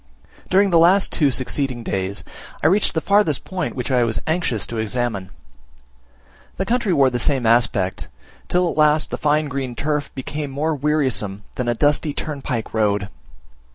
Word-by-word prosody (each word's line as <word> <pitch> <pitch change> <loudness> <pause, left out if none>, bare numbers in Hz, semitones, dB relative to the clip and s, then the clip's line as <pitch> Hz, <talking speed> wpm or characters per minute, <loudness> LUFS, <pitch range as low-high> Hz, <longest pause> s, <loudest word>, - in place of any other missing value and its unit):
During 195 +1 +3
the 175 +4 +5
two 145 -3 +3
succeeding 130 -1 -1
days, 95 -1 -3 0.4
I - - -1
reached 190 +3 +3
the 160 - +1
furthest 200 -9 +2
point 185 -3 -4
which 125 +1 -3
I 125 -2 +3
was 115 -1 +2
anxious 155 - -1
to 115 +1 -5
examine. 110 -3 -2 1.3
The 190 - -1
country 235 -3 0
wore 140 -6 +4
the 120 - -1
same 130 -1 +1
aspect, 110 -5 +1 0.4
till 180 0 +2
at - - -9
last 150 0 +3
the - - -4
fine 150 0 +1
green 135 -3 -4
turf 150 +1 -2
became 145 +2 -4
more 150 +4 -1
wearisome 130 -9 0
than 125 - -3
a 120 - +1
dusty 145 +3 +1
turnpike 135 -6 -4
road. 105 -2 0
140 Hz, 160 wpm, -21 LUFS, 120-155 Hz, 1.3 s, the